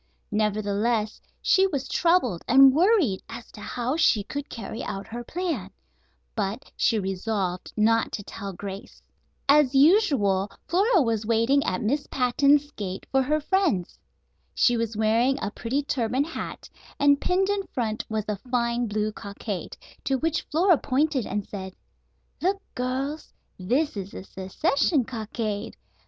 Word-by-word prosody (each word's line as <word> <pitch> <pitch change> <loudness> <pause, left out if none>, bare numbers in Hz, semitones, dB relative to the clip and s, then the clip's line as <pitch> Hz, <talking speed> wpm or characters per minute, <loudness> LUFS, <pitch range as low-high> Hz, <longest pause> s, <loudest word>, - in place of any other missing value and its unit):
Nevertheless 210 +1 0 0.2
she 385 0 +4
was 280 -8 -3
troubled 335 - +2
and 270 +1 +7
worried 330 - +3
as 235 +1 -9
to 210 - -12
how 245 +5 -2
she 235 -10 +3
could 285 +6 -6
carry 225 0 -6
out 195 0 -5
her 240 +2 -7
plan; 320 - -3 0.7
but 205 +7 -3
she 225 - +2
resolved 190 -1 -2
not 225 +1 +3
to 205 - -4
tell 195 0 -7
Grace. 195 +1 -8 0.4
As 285 -2 +5
usual 270 - +4 0.2
Flora 385 - +3
was 225 -3 0
waiting 235 +5 +3
at 185 - -1
Miss 280 +7 0
Patten's 280 +3 +3
gate 190 -6 -6
for 270 - +3
her 300 +4 +1
friends. 310 - 0 0.6
She 245 - +4
was 230 -2 -2
wearing 230 +5 +2
a 205 - -3
pretty 255 +6 -2
turban 255 -1 0
hat, 330 - -6 0.3
and 285 0 +4
pinned 380 +2 +1
in 405 -1 -1
front 220 -3 -2
was 220 -1 -2
a 210 -1 -2
fine 240 -1 0
blue 215 0 -1
cockade, 200 -2 -6 0.3
to 270 - +1
which 325 +4 0
Flora 345 +1 +4
pointed 280 -2 0
and 205 0 -3
said: 190 -2 -7 0.7
"Look, 390 +3 +1
girls. 265 +5 -3 0.3
This 255 +12 0
is 195 -1 -5
the - - -7
Secession 275 - 0
Cockade. 220 -3 -4
240 Hz, 145 wpm, -25 LUFS, 210-285 Hz, 0.7 s, and